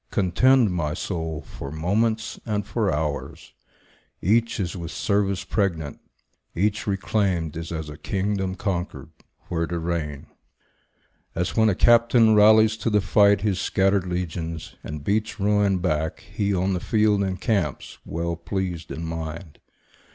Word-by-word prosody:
Contend, 110 +5 +3
my 75 -4 -1
soul, 80 -4 -4
for 70 - -8
moments 110 +8 0
and 105 -3 -2
for 105 -2 0
hours; 75 -1 -4 0.7
Each 115 +5 +1
is 90 -2 -2
with 85 -3 -6
service 100 -1 0
pregnant; 85 -8 -2 0.6
each 105 +5 0
reclaimed 95 -5 0
Is 80 +1 -6
as 80 -2 -4
a 75 0 -9
kingdom 95 +1 -2
conquered, 90 -3 -4 0.4
where 85 -1 -1
to 85 - -3
reign. 80 -4 -3 1.1
As 90 +2 -2
when 110 -1 +4
a 100 - +1
captain 115 0 +5
rallies 110 +1 +6
to 115 - -1
the 105 -1 +3
fight 100 +1 +4
His 100 -3 0
scattered 95 -1 +1
legions, 85 -2 -4
and 75 -1 -6
beats 110 +5 -1
ruin 100 -1 +2
back, 80 -3 -1
He, 100 -1 -2
on 95 0 +1
the 90 - -1
field, 105 0 +2
encamps, 95 - -2
well 85 +1 -3
pleased 90 -1 -4
in 80 - -5
mind. 80 0 -6
95 Hz, 140 wpm, -24 LUFS, 85-105 Hz, 1.1 s, rallies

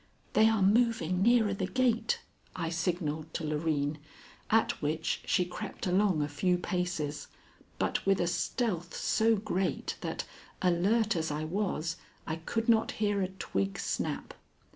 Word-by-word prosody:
"They 220 +1 +6
are 220 -3 +2
moving 200 -4 +3
nearer 225 -1 +4
the 190 -1 -2
gate," 255 - +1 0.3
I 165 -3 -2
signalled 160 -2 -2
to - - -2
Loreen, 150 -1 0 0.5
at 225 +1 +2
which 155 +2 -1
she 180 - +2
crept 175 - -6
along 185 -4 +3
a - - -1
few 180 +5 +1
paces, 175 -5 -2 0.5
but - - 0
with 195 -1 +3
a - - +2
stealth 175 0 -1
so 225 0 +3
great 195 -3 -2
that, - - -3 0.3
alert 200 +5 +2
as 160 -1 -1
I 150 +1 -2
was, 165 -2 -1 0.3
I 160 - -2
could 225 +8 -2
not 225 -1 +3
hear 205 -2 0
a 185 - +1
twig 100 - -2
snap. - - -3
180 Hz, 145 wpm, -31 LUFS, 160-215 Hz, 0.5 s, They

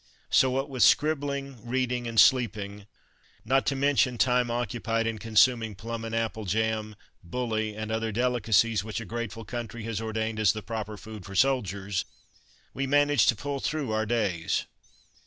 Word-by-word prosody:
So 130 - +5
what 135 +2 -1
with 130 -3 -4
scribbling, 140 -5 +2
reading 125 0 -1
and 115 -1 +1
sleeping, 105 -6 +3 0.6
not 135 +3 +2
to 140 - +1
mention 135 -3 +2
time 125 0 +2
occupied 115 -1 -1
in 115 -1 -2
consuming 115 0 +3
plum 115 +4 -6
and 115 0 -4
apple 110 -1 -2
jam, 110 +2 -1 0.3
bully, 110 +2 -2
and 110 0 -5
other 110 0 -1
delicacies 115 -3 +2
which 110 +1 -4
a 115 - -7
grateful 115 +1 -5
country 120 +1 -6
has 115 -1 -3
ordained 110 0 -2
as 110 -4 +4
the 110 -1 -6
proper 110 -1 -5
food 110 -3 -10
for 100 +1 -9
soldiers, 100 -6 +1 0.7
we 135 +1 -2
managed 145 -5 +4
to - - +4
pull 140 +5 -4
through 145 -4 -2
our 110 0 0
days. 100 -8 0
115 Hz, 160 wpm, -27 LUFS, 110-125 Hz, 0.7 s, So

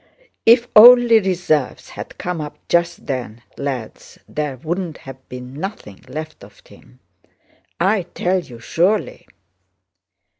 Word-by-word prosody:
"If 235 +1 +6
only 240 +1 +9
reserves 175 -8 -1
had - - -9
come 175 -2 -4
up 150 -1 -7
just 170 0 0
then, 120 -4 -5
lads, 130 -5 -6
there 150 -3 -4
wouldn't 170 +3 -4
have 130 -1 -13
been 125 0 -9
nothing 150 - -7
left 155 +4 -8
of - - -16
him! 60 - -19 0.8
I 190 0 +1
tell 185 +1 +1
you 125 -9 -11
surely...." 190 - -1
160 Hz, 120 wpm, -19 LUFS, 130-190 Hz, 0.8 s, only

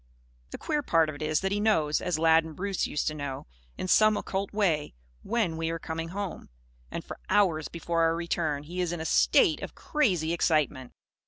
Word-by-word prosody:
The - - -7
queer 300 -1 -1
part 165 - +2
of 155 - -5
it - - -13
is 155 0 0
that 190 0 -1
he 205 - 0
knows 160 -9 +2
as 180 -3 -1
Lad 165 0 +5
and 160 -1 -9
Bruce 195 +2 -1
used 150 - -2
to - - -6
know 140 -3 -5 0.3
in - - -4
some 215 +3 +5
occult 195 0 -3
way, 170 - 0 0.3
when 210 -8 -1
we 165 0 -1
are 165 - -2
coming 165 0 -5
home. 195 0 -5 0.4
And, - - -6
for - - -8
hours 185 -6 +2
before 170 0 -2
our 165 0 +3
return, 165 -4 -2
he 175 +4 -4
is 175 -2 -1
in 175 - -4
a 160 - -4
state 345 - +4
of - - -7
crazy 180 - 0
excitement. 150 -6 0
165 Hz, 210 wpm, -28 LUFS, 155-195 Hz, 0.4 s, Lad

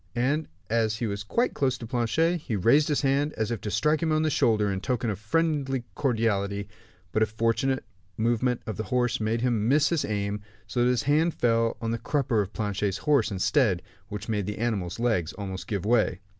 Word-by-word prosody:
And 140 +6 +1 0.2
as 110 0 +1
he 115 - -2
was 100 -2 -3
quite 235 - 0
close 130 -3 0
to 115 - -8
Planchet, 125 +9 +1
he 140 -8 -4
raised 130 +10 +4
his 150 - +1
hand, 140 +2 +1
as 110 +1 -2
if 115 - -3
to 105 - -3
strike 150 +10 +1
him 165 -1 +1
on 155 0 +2
the 155 - +1
shoulder, 105 -6 +2
in 95 -1 -3
token 120 -2 -1
of 100 - -5
friendly 135 +1 0
cordiality; 100 -6 0 0.4
but 110 - 0
a 110 - +4
fortunate 115 +5 0 0.3
movement 120 +2 +1
of 110 - -4
the 110 - -3
horse 125 -1 0
made 110 +2 0
him 115 -4 +1
miss 145 +1 +4
his 170 -4 +1
aim, 105 0 -2 0.2
so 120 - -1
that 120 - +4
his 125 -1 +1
hand 155 +4 +2
fell 115 -1 +1
on 115 0 -2
the 115 - -2
crupper 130 -7 +1
of 100 0 -4
Planchet's 105 -2 -1
horse, 145 -7 +3
instead; 100 - +1 0.2
which 105 +1 -6
made 105 -4 -1
the 105 - -4
animal's 105 -5 -2
legs 110 -9 0
almost 95 -2 -6
give 100 -3 -2
way. 110 -5 +2
115 Hz, 210 wpm, -27 LUFS, 105-135 Hz, 0.4 s, raised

